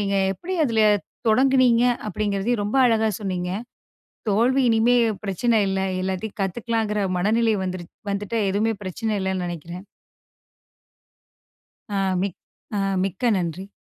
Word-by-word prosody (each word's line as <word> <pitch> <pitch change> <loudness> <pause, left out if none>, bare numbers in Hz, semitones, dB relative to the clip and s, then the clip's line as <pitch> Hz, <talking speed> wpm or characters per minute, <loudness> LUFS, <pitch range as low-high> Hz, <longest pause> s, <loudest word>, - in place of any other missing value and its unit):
நீங்க 200 -1 -1 0.2
எப்படி 370 - -5
அதுல 225 -3 +2 0.5
தொடங்கினீங்க? 250 0 +4 0.2
அப்படிங்கிறதையும் 205 +2 -1
ரொம்ப 210 +6 -1
அழகா 220 -1 +2
சொன்னீங்க. 180 -3 -3 0.8
"தோல்வி" 245 +6 +3
இனிமே 230 +2 +4 0.3
பிரச்சன 220 +4 +2
இல்ல. 190 0 0 0.2
எல்லாத்தையும் 190 +4 -4
கத்துக்கலாங்குற 210 +1 -1 0.2
மனநிலை 220 +4 +2
வந்துருச் 180 -2 -6 0.2
வந்துட்டு 205 +3 -2
எதுவுமே 220 +3 +1
பிரச்சன 215 +4 -2
இல்லைன்னு 190 -1 -1
நெனைக்கிறேன். 175 +2 -7 2.1
அ 200 - 0 0.2
மிக் 195 -3 -3 0.4
அ - - +1 0.3
மிக்க 195 +6 0
நன்றி. 180 +2 -4
210 Hz, 115 wpm, -23 LUFS, 190-230 Hz, 2.1 s, தொடங்கினீங்க